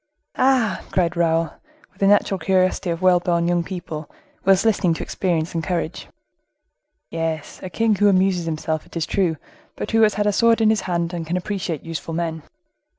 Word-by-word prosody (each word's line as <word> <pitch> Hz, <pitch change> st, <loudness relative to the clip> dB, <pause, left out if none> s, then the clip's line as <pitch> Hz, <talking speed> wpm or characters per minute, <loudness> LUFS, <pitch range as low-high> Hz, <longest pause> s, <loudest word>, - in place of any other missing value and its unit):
"Ah!" 255 Hz, -4 st, +2 dB
cried 180 Hz, -2 st, 0 dB
Raoul, 165 Hz, -1 st, +1 dB, 0.4 s
with -, -, -28 dB
the 195 Hz, -, +3 dB
natural 200 Hz, -1 st, +3 dB
curiosity 185 Hz, +1 st, +1 dB
of 170 Hz, +2 st, -3 dB
well 180 Hz, -1 st, +5 dB
born 170 Hz, -1 st, 0 dB
young 175 Hz, -1 st, +1 dB
people, 170 Hz, -4 st, -6 dB, 0.3 s
while 195 Hz, 0 st, +5 dB
listening 185 Hz, -6 st, +2 dB
to -, -, -5 dB
experience 170 Hz, -3 st, -1 dB
and 165 Hz, -1 st, -2 dB
courage. 170 Hz, -3 st, -3 dB, 1.0 s
"Yes, 165 Hz, -2 st, -3 dB
a 185 Hz, -, -6 dB
king 225 Hz, +5 st, +1 dB
who 205 Hz, +1 st, +3 dB
amuses 185 Hz, -2 st, +2 dB
himself, 155 Hz, -1 st, -3 dB
it -, -, -8 dB
is 165 Hz, -, 0 dB
true, 175 Hz, -5 st, 0 dB, 0.4 s
but -, -, -5 dB
who 225 Hz, 0 st, +3 dB
has 215 Hz, -2 st, +4 dB
had 205 Hz, -, 0 dB
a 210 Hz, -, +2 dB
sword 230 Hz, +2 st, +4 dB
in 220 Hz, -1 st, +4 dB
his 215 Hz, -2 st, +1 dB
hand, 170 Hz, 0 st, -1 dB
and 165 Hz, -2 st, -4 dB
can 175 Hz, +2 st, -1 dB
appreciate 180 Hz, -5 st, -3 dB
useful 165 Hz, 0 st, -5 dB
men. 165 Hz, -1 st, -2 dB
175 Hz, 190 wpm, -22 LUFS, 165-195 Hz, 1.0 s, well